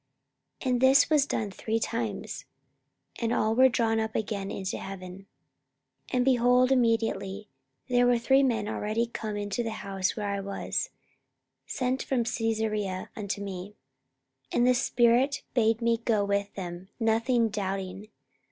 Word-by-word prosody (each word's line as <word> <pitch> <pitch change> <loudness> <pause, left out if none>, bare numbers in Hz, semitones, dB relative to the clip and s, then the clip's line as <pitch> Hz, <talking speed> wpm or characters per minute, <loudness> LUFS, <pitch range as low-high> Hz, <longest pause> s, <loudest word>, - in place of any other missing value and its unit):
44:011:010 260 - 0
And 245 -1 +1
this 265 +1 +6
was 295 -3 +5
done 210 -7 -2
three 220 +3 -2
times: 225 -3 -3 0.7
and 230 -1 0
all 220 -2 +2
were 260 +3 +6
drawn 225 -2 +1
up 220 0 -3
again 200 -2 -2
into 190 -1 -4
heaven. 190 0 -8 0.8
44:011:011 - - -14
And, 250 0 +2
behold, 250 0 +4
immediately 225 -5 +1 0.4
there 245 -1 +3
were 245 -1 +4
three 265 +4 +4
men 230 -6 +1
already 215 +3 -1
come 220 -3 -5
unto 205 +3 -2
the 230 - -2 0.2
house 195 -1 -1
where 210 -2 -3
I 200 - -2
was, 195 0 -3 0.8
sent 255 0 -1
from 255 -3 0
Caesarea 220 -5 -2
unto 205 -1 -4
me. 195 +1 -7 0.8
44:011:012 - - -1
And 240 - +4
the 250 - +6
Spirit 245 +3 +2
bade 225 -1 +2
me 230 -1 +2
go 220 -3 +1
with 200 0 -1
them, 180 0 -7
nothing 230 +1 +2
doubting. 195 -1 -4
225 Hz, 150 wpm, -28 LUFS, 200-245 Hz, 0.8 s, this